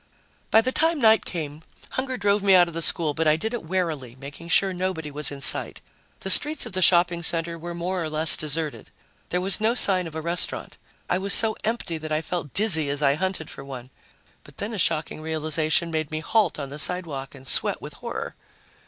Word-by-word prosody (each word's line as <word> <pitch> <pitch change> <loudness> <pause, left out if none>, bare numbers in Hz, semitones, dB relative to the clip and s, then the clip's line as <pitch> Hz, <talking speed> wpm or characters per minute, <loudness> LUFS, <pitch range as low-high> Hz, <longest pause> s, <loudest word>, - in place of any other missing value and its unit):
By 220 - +5
the 255 +3 -2
time 325 +3 0
night 220 -3 +4
came, 155 -3 -6 0.3
hunger 260 0 -3
drove 205 -1 +1
me 195 -1 +4
out 175 -1 +5
of 170 - -9
the 165 - -4
school, 160 -2 +3
but 160 +2 -1
I 155 - +4
did 220 +9 -4
it 240 - -3
warily, 160 -8 -3
making 140 +5 -11
sure 190 +3 +3
nobody 180 -4 -4
was 150 +1 -2
in 140 -1 -8
sight. - - +3 0.4
The 190 - -1
streets 300 +8 +2
of - - -10
the 185 - -1
shopping 175 -1 +3
center 170 0 0
were 170 +1 -8
more 180 +1 -3
or 160 - -4
less 155 +1 +6
deserted. 155 0 0 0.4
There 180 - -1
was 190 +3 +1
no 225 +2 +1
sign 185 -7 +3
of 160 - -11
a 160 - -4
restaurant. 170 +2 -2 0.3
I 180 - 0
was 195 0 +3
so 220 -1 +2
empty 215 -7 -3
that 155 0 -7
I 155 +1 -1
felt 165 -4 -5
dizzy 170 -9 +5
as 145 +1 -2
I 140 -1 +4
hunted 185 0 -3
for - - -10
one. 130 -2 -10 0.5
But 145 - -18
then 210 +3 -4
a 210 - -4
shocking 155 -2 0
realization 155 +1 0
made 155 -2 -3
me 155 - -4
halt 195 +1 0
on 140 -2 -6
the 145 +2 -8
sidewalk 150 -6 -2
and 135 0 -14
sweat - - 0
with - - -10
horror. - - -6
170 Hz, 220 wpm, -24 LUFS, 155-190 Hz, 0.5 s, less